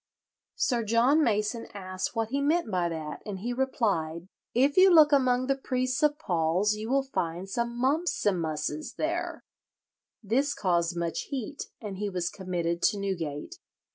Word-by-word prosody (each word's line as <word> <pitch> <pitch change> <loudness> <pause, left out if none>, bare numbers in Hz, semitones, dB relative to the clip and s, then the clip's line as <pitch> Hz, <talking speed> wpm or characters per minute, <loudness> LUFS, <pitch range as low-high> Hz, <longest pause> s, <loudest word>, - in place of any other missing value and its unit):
"Sir 240 -3 +1
John 240 +8 +4
Mason 215 0 0
asked 185 +2 -4
what 225 -1 -1
he 275 +3 -1
meant 305 -3 +1
by 175 -2 +1
that, 160 -2 -5
and 205 -3 -5
he 240 +3 -2
replied, 190 - -1 0.3
'If 275 +4 +3
you 375 0 +7
look 310 -3 +7
among 255 -2 +3
the 275 +1 +1
priests 255 0 -1
of 300 -1 +3
Paul's 180 - +1
you 215 +2 -5
will 275 +1 +2
find 180 -8 -3
some 235 +4 -2
mumpsimusses 190 - 0
there.' 335 +3 -2 0.8
This 265 +8 +1
caused 175 -2 0
much 170 -1 -2
heat, 275 +1 -4
and 205 -4 -6
he 205 0 -1
was 180 -2 -2
committed 175 -3 -2
to 205 - +3
Newgate." 190 - -4
215 Hz, 155 wpm, -28 LUFS, 180-270 Hz, 0.8 s, you